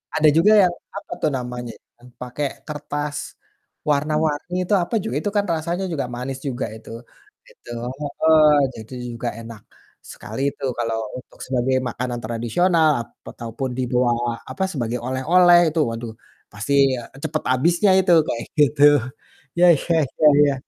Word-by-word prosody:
ada 155 0 +4
juga 200 +6 +5
yang 175 -1 +2 0.2
apa - - -10
tuh - - +2
namanya, 125 -1 -6 0.2
yang 120 +1 -17
pakai 125 +3 -3 0.2
kertas, 145 -1 -5 0.5
warna-warni 150 +3 0
itu 180 - -1
apa 200 +7 -4
juga, 125 - -4
itu 205 - -1
kan 205 - +2
rasanya 170 +4 -2
juga 140 -6 -2
manis 130 +2 -5
juga 130 -1 -2
itu, 110 - -13 0.6
gitu, - - -15 0.3
heeh, 155 +1 +4 0.2
jadi 110 +2 -10 0.2
juga 120 +1 -5
enak 115 -2 -10 0.5
sekali - - -7
itu - - -15 0.2
kalau 115 -1 -1 0.2
untuk 125 - -14
sebagai 130 0 0
makanan 120 0 -4
tradisional, 155 +9 +1
ap - - -11 0.2
ataupun 120 +3 -5
dibawa 125 -1 +1 0.4
apa, 190 - -3
sebagai 120 -3 -2
oleh-oleh 175 +7 +5
itu. 160 - -1
Waduh 115 0 -6 0.4
pasti 105 +7 -3 0.3
,eee, 125 - -14
cepat 155 0 -2
habisnya 170 +9 +3
itu, 185 -2 +3
kayak 115 - -3 0.2
gitu. 145 -1 +4 0.8
Ya 180 - +7 0.2
ya 170 - +3 0.3
ya 155 - +7 0.2
ya, 140 - +1
135 Hz, 150 wpm, -21 LUFS, 120-160 Hz, 0.8 s, Ya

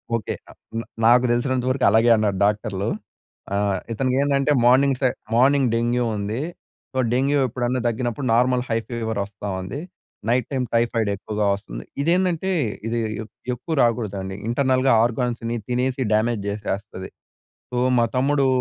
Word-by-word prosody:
Okay. 110 -4 -3 0.2
అ - - -15 0.2
హ్మ్. 115 +1 -3 0.2
నాకు 120 +2 +6
తెలిసినంత 125 +1 0
వరకు 130 - +1
అలాగే 115 +3 +4
అన్నారు 105 -3 0
డాక్టర్లు. 105 -1 -1 0.6
ఆహ్, 100 -1 +1 0.2
ఇతనికి 130 +3 0
ఏందంటే 140 0 +2
మార్నింగ్ 130 +2 +5
సైడ్ 130 -2 +2 0.2
మార్నింగ్ 135 0 +4
డెంగ్యూ 120 +1 +1
ఉందీ. 105 +5 -3 0.5
సో, 130 - -5 0.2
డెంగ్యూ 140 +3 +2
ఎప్పుడన్నా 125 +1 -1
తగ్గినప్పుడు 120 +3 -2
నార్మల్ 125 +1 +3
హై 115 - +1
ఫీవర్ 110 -3 -3
వస్తా 100 0 -9
ఉంది. 100 +10 -5 0.5
నైట్ 125 0 +2
టైమ్ 130 -2 0
టైఫయిడ్ 115 -2 +1
ఎక్కువగా 105 +1 -2
వస్తుంది. - - -7 0.2
ఇదేందంటే 180 +3 +1 0.4
ఇది 115 +1 -1 0.5
ఎక్కువ 160 +7 -5
రాకూడదండి. 100 -5 -1
ఇంటర్నల్‌గా 130 +1 +2
ఆర్గా‌న్స్‌ని 120 0 -1
తినేసి 125 +1 0
డ్యామేజ్ 110 0 +1
చేసేస్తది. 100 -2 -4 0.6
సో, 125 - -4 0.2
మా 115 - +4
తమ్ముడూ 140 +1 +2
120 Hz, 140 wpm, -23 LUFS, 110-130 Hz, 0.6 s, నాకు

